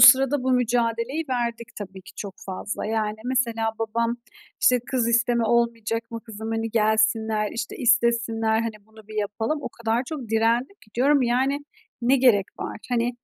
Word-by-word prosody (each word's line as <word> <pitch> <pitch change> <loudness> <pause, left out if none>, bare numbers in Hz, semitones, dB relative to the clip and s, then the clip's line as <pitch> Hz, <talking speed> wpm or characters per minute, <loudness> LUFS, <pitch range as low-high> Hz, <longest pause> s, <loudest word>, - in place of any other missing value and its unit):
sırada 265 +2 +8
bu 260 - +1
mücadeleyi 240 +4 +1
verdik 235 -2 -2
tabii 190 -2 -8
ki - - -13
çok 200 -2 -6
fazla. 195 +3 -4
Yani, 215 -1 -1
mesela 230 -3 +1
babam 230 +1 0 0.4
işte, 250 -1 +5
"Kız 245 -3 +1
isteme 235 0 +2
olmayacak 230 -1 0
mı 230 0 -5
kızım? 220 0 -6
Hani, 225 0 -1
gelsinler, 220 -1 +2
işte, 230 0 -4
istesinler, 235 -2 +2
hani, 215 -2 -5
bunu 220 -1 -17
bir 215 - -9
yapalım." 220 +8 -2
O - - -3
kadar 230 +1 -1
çok 280 -8 -6
direndim 230 - +1
ki 215 - -25
diyorum, 275 +3 +4
yani, 265 +4 +1 0.4
"Ne 260 +3 +4
gerek 235 -7 +4
var?" - - -4
Hani, 240 0 0
230 Hz, 160 wpm, -24 LUFS, 220-245 Hz, 0.4 s, sırada